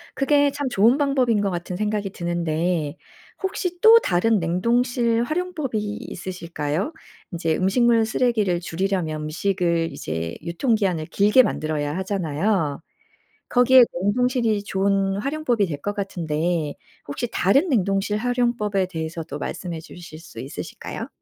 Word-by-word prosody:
그게 285 Hz, 0 st, +3 dB
참 285 Hz, 0 st, -3 dB
좋은 230 Hz, +4 st, +4 dB
방법인 260 Hz, -7 st, +2 dB
것 200 Hz, -, 0 dB
같은 175 Hz, +1 st, -4 dB
생각이 210 Hz, -1 st, -1 dB
드는데 170 Hz, -2 st, -1 dB, 0.5 s
혹시 360 Hz, -2 st, -2 dB
또 445 Hz, +1 st, +9 dB
다른 215 Hz, -, +2 dB
냉동실 235 Hz, +7 st, +1 dB
활용법이 310 Hz, -5 st, -2 dB, 0.3 s
있으실까요? 170 Hz, -, -4 dB, 0.4 s
인제 165 Hz, -2 st, 0 dB
음식물 230 Hz, +4 st, +3 dB
쓰레기를 220 Hz, -6 st, +1 dB
줄이려면 170 Hz, -3 st, -2 dB
음식을 170 Hz, +1 st, 0 dB
이제 80 Hz, +1 st, -4 dB
유통기한을 185 Hz, -, 0 dB
길게 205 Hz, +7 st, +5 dB
만들어야 155 Hz, -7 st, -2 dB
하잖아요. 185 Hz, -4 st, -1 dB, 0.7 s
거기에 255 Hz, +1 st, +6 dB, 0.2 s
냉동실이 230 Hz, 0 st, +1 dB
좋은 195 Hz, 0 st, +1 dB
활용법이 255 Hz, -4 st, 0 dB
될 150 Hz, -5 st, -4 dB
것 205 Hz, +6 st, -3 dB
같은데 165 Hz, -5 st, -2 dB, 0.3 s
혹시 235 Hz, +12 st, -3 dB
다른 275 Hz, -, +3 dB
냉동실 200 Hz, -, +1 dB
활용법에 235 Hz, -5 st, 0 dB
대해서도 160 Hz, -3 st, -5 dB
말씀해 170 Hz, +1 st, -5 dB
주실 170 Hz, -1 st, -11 dB
수 160 Hz, -8 st, -13 dB
있으실까요? 135 Hz, +4 st, -7 dB
195 Hz, 315 characters per minute, -23 LUFS, 170-240 Hz, 0.7 s, 또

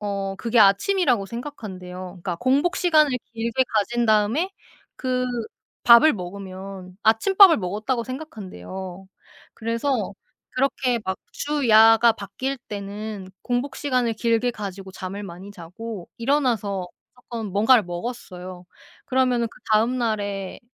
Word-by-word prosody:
어 195 Hz, -1 st, -3 dB
그게 230 Hz, +1 st, +2 dB
아침이라고 225 Hz, -, +3 dB
생각한대요. 200 Hz, -7 st, -7 dB, 0.2 s
그러니까 175 Hz, -2 st, -3 dB
공복 275 Hz, -, +1 dB
시간을 310 Hz, -5 st, +4 dB, 0.2 s
길게 230 Hz, +3 st, 0 dB
가진 235 Hz, +3 st, +1 dB
다음에 220 Hz, -, +2 dB, 0.5 s
그 255 Hz, -1 st, -1 dB, 0.6 s
밥을 240 Hz, +6 st, +8 dB
먹으면 190 Hz, -1 st, -8 dB
아침밥을 370 Hz, -, +6 dB
먹었다고 215 Hz, +6 st, -2 dB
생각한대요. 190 Hz, -, -8 dB, 0.5 s
그래서 230 Hz, -1 st, -1 dB, 0.4 s
그렇게 255 Hz, -2 st, 0 dB
막 190 Hz, 0 st, -2 dB
주야가 230 Hz, -5 st, +5 dB
바뀔 255 Hz, +7 st, -4 dB
때는 205 Hz, 0 st, -6 dB, 0.2 s
공복 245 Hz, +3 st, -2 dB
시간을 250 Hz, -5 st, 0 dB
길게 235 Hz, +2 st, +1 dB
가지고 195 Hz, -2 st, -7 dB
잠을 195 Hz, +2 st, -6 dB
많이 185 Hz, +2 st, -9 dB
자고 195 Hz, +2 st, -8 dB
일어나서 230 Hz, -8 st, 0 dB, 0.3 s
조금 235 Hz, -3 st, -6 dB
뭔가를 220 Hz, +5 st, +4 dB
먹었어요. 180 Hz, -2 st, -7 dB, 0.4 s
그러면은 255 Hz, -3 st, +1 dB
그다음 230 Hz, +3 st, +1 dB
날에 205 Hz, -5 st, -2 dB
220 Hz, 290 characters per minute, -23 LUFS, 195-250 Hz, 0.6 s, 밥을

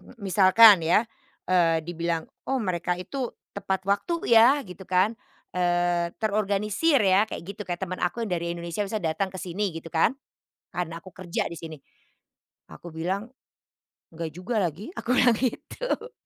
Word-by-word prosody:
M -, -, -16 dB
misalkan 195 Hz, +1 st, +7 dB
ya, 180 Hz, +7 st, +4 dB, 0.4 s
eee, 165 Hz, -3 st, +3 dB
dibilang, 170 Hz, -1 st, -2 dB, 0.2 s
"Oh 270 Hz, -, +1 dB
mereka 180 Hz, -3 st, -1 dB
itu 240 Hz, +7 st, -4 dB, 0.2 s
tepat 190 Hz, -1 st, -2 dB
waktu 335 Hz, -, 0 dB
ya," 255 Hz, +6 st, +7 dB
gitu 180 Hz, -1 st, -11 dB
kan, 185 Hz, +4 st, +3 dB, 0.4 s
eee, 175 Hz, -1 st, +1 dB
"terorganisir 210 Hz, +7 st, +1 dB
ya," 195 Hz, 0 st, +4 dB
kayak -, -, -6 dB
gitu 200 Hz, +3 st, -7 dB
kayak 175 Hz, +1 st, -3 dB
teman 185 Hz, 0 st, -6 dB
aku 180 Hz, +7 st, -1 dB
yang 205 Hz, -, -6 dB
dari 170 Hz, -1 st, -1 dB
Indonesia 170 Hz, +3 st, -5 dB
misalnya 195 Hz, -6 st, -2 dB
datang 195 Hz, +3 st, -1 dB
ke 185 Hz, -, -7 dB
sini 190 Hz, +1 st, -2 dB
gitu 165 Hz, 0 st, -7 dB
kan, 190 Hz, +10 st, +2 dB, 0.6 s
karena 170 Hz, -1 st, -4 dB
aku 185 Hz, -, -14 dB
kerja 180 Hz, -2 st, -3 dB
di -, -, -7 dB
sini. 160 Hz, -1 st, -8 dB, 0.9 s
Aku 175 Hz, -, -10 dB
bilang, 190 Hz, +8 st, -3 dB, 0.8 s
"Nggak 165 Hz, -1 st, -5 dB
juga 205 Hz, +6 st, -3 dB
lagi," 185 Hz, -, -3 dB
aku 230 Hz, -, -5 dB
bilang 245 Hz, -3 st, +5 dB
gitu. 455 Hz, -, -3 dB
185 Hz, 160 wpm, -26 LUFS, 175-215 Hz, 0.9 s, misalkan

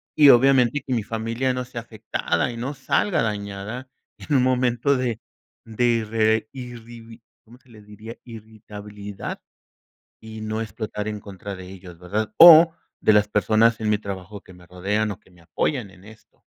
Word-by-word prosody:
y 145 Hz, -2 st, +7 dB
obviamente 135 Hz, +2 st, +4 dB
que 130 Hz, -, -1 dB
mi 115 Hz, -3 st, -1 dB
familia 115 Hz, +4 st, -2 dB
no 125 Hz, 0 st, -4 dB
sea 120 Hz, -2 st, -7 dB
afectada 110 Hz, -5 st, -2 dB
y -, -, -8 dB
no 130 Hz, +5 st, -4 dB
salga 170 Hz, +3 st, 0 dB
dañada 105 Hz, +4 st, -5 dB, 0.3 s
en 145 Hz, -, -3 dB
un 125 Hz, -, +3 dB
momento 130 Hz, +1 st, +1 dB
de 120 Hz, -4 st, -3 dB, 0.5 s
de 115 Hz, +2 st, -1 dB, 0.2 s
irre 110 Hz, 0 st, +1 dB
irribi 120 Hz, -2 st, -11 dB, 0.2 s
¿cómo 120 Hz, +3 st, -17 dB
se 130 Hz, -, -28 dB
le 110 Hz, -2 st, -15 dB
diría?, 105 Hz, +3 st, -11 dB
irritabilidad, 105 Hz, -3 st, -9 dB, 0.8 s
y 110 Hz, 0 st, -9 dB
no 110 Hz, +1 st, -3 dB
explotar 110 Hz, -1 st, -5 dB
en 105 Hz, -1 st, -5 dB
contra 100 Hz, 0 st, -8 dB
de 90 Hz, 0 st, -10 dB
ellos, 90 Hz, -2 st, -12 dB
¿verdad?, 105 Hz, +4 st, -3 dB
o 165 Hz, -1 st, +9 dB, 0.3 s
de 110 Hz, -, +4 dB
las 105 Hz, 0 st, +4 dB
personas 110 Hz, +3 st, +2 dB
en 105 Hz, -, -1 dB
mi 105 Hz, -, +2 dB
trabajo 100 Hz, 0 st, -8 dB
que 95 Hz, -, -16 dB
me 90 Hz, -1 st, -17 dB
rodean, 105 Hz, +4 st, -2 dB
o 95 Hz, -, -8 dB
que 95 Hz, -, -26 dB
me 90 Hz, -1 st, -21 dB
apoyan 115 Hz, -, -2 dB
en 90 Hz, 0 st, -19 dB
esto. 110 Hz, 0 st, -18 dB
110 Hz, 175 wpm, -23 LUFS, 105-120 Hz, 0.8 s, o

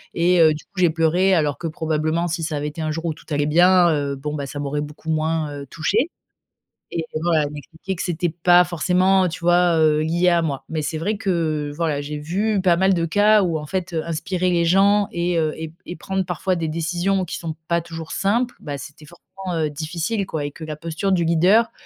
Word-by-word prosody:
et 175 Hz, +1 st, +3 dB
heu, 155 Hz, -1 st, +6 dB
du 150 Hz, -, -8 dB
coup, 200 Hz, -, -30 dB
j'ai 175 Hz, -2 st, +5 dB
pleuré, 175 Hz, +4 st, +2 dB
alors 150 Hz, -3 st, +1 dB
que, 170 Hz, -, -3 dB
probablement, 160 Hz, +1 st, -1 dB
si 165 Hz, 0 st, -3 dB
ça 155 Hz, -2 st, -2 dB
avait 145 Hz, -, -3 dB
été 160 Hz, +2 st, -7 dB
un 155 Hz, -, -1 dB
jour 165 Hz, +2 st, -4 dB
où 165 Hz, -, 0 dB
tout -, -, -18 dB
allait 145 Hz, 0 st, +1 dB
bien, 175 Hz, +2 st, +5 dB
heu, 140 Hz, -2 st, -1 dB
bon, 150 Hz, +2 st, -5 dB
bah, 140 Hz, -1 st, -3 dB
ça 145 Hz, -, -6 dB
m'aurait 145 Hz, +1 st, -2 dB
beaucoup 150 Hz, +2 st, -8 dB
moins, 155 Hz, -1 st, 0 dB
heu, 140 Hz, -, -7 dB
touchée». 215 Hz, -, 0 dB, 0.8 s
Et, 165 Hz, -, -2 dB, 0.2 s
voilà, 165 Hz, -3 st, +2 dB
elle 145 Hz, -, -4 dB
m'expliquait 160 Hz, +5 st, -7 dB
que -, -, -4 dB
c'était 175 Hz, 0 st, -1 dB
pas 175 Hz, +2 st, +5 dB
forcément, 185 Hz, +2 st, +2 dB
tu 175 Hz, +1 st, -6 dB
vois, 175 Hz, 0 st, +3 dB
heu, 155 Hz, -1 st, +4 dB
lié 170 Hz, +3 st, +2 dB
à 170 Hz, -1 st, +3 dB
moi. 145 Hz, -5 st, -3 dB
Mais 160 Hz, -1 st, -2 dB
c'est 155 Hz, +2 st, -3 dB
vrai 205 Hz, +5 st, -1 dB
que, 160 Hz, -6 st, -1 dB
voilà, 155 Hz, -3 st, -1 dB
j'ai 150 Hz, +1 st, -5 dB
vu 195 Hz, +6 st, 0 dB
pas 175 Hz, -2 st, +3 dB
mal 190 Hz, +1 st, +3 dB
de 170 Hz, -2 st, 0 dB
cas 205 Hz, +4 st, +4 dB
où, 170 Hz, -3 st, 0 dB
en 150 Hz, -, -7 dB
fait, 185 Hz, +3 st, -3 dB
heu, 160 Hz, -1 st, -1 dB
inspirer 175 Hz, +3 st, -1 dB
les 170 Hz, -1 st, +2 dB
gens 200 Hz, +3 st, +4 dB
et 170 Hz, 0 st, -1 dB
heu, 155 Hz, -1 st, 0 dB
et 160 Hz, 0 st, -6 dB
et 175 Hz, -, -7 dB
prendre 190 Hz, 0 st, -2 dB
parfois 185 Hz, +2 st, -1 dB
des 165 Hz, -2 st, -2 dB
décisions 175 Hz, +4 st, -1 dB
qui -, -, -5 dB
sont 160 Hz, -2 st, -5 dB
pas 170 Hz, 0 st, +2 dB
toujours 165 Hz, -1 st, -8 dB
simples, 235 Hz, +5 st, 0 dB
bah, 145 Hz, -2 st, -5 dB
c'était 150 Hz, +2 st, -11 dB
forcément, 170 Hz, +3 st, -18 dB, 0.4 s
heu, 150 Hz, -, -1 dB
difficile, 165 Hz, +8 st, -3 dB
quoi, 155 Hz, -5 st, -4 dB
et 145 Hz, -, -4 dB
que 160 Hz, -, -11 dB
la 155 Hz, -1 st, -5 dB
posture 165 Hz, +5 st, -2 dB
du 175 Hz, -2 st, +2 dB
leader, 180 Hz, +8 st, +4 dB
165 Hz, 235 wpm, -21 LUFS, 155-180 Hz, 0.8 s, heu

